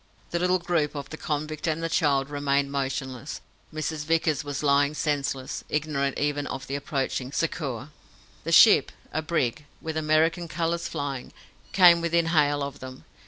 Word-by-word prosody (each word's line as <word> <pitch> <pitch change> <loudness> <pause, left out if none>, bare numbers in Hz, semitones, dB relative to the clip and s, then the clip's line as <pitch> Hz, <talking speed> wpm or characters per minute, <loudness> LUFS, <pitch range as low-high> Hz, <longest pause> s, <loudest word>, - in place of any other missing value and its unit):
The 170 - 0
little 180 +1 +2
group 170 -4 -1
of 140 -1 -6
the - - -4
convict 155 +1 -3
and 160 +1 -1
the - - +1
child 145 -4 +1
remained 140 -1 0
motionless. 135 -2 -3 0.3
Mrs. 155 0 -3
Vickers 160 -2 +1
was 145 0 -4
lying 145 +1 +3
senseless, 140 -3 -2
ignorant 150 -2 -1
even 145 0 -1
of 135 - -5
the 135 - -6
approaching 135 -2 -2
succour. 145 -4 -3 0.5
The - - -3
ship - - +7 0.2
a 155 - 0
brig, 150 -2 -1
with 160 -1 -5
American 160 +3 +2
colours 165 +1 -2
flying 135 -3 -4 0.4
came 175 -3 +7
within 170 0 +2
hail 145 -2 +3
of 140 0 -6
them. 130 0 -10
150 Hz, 160 wpm, -26 LUFS, 140-160 Hz, 0.5 s, ship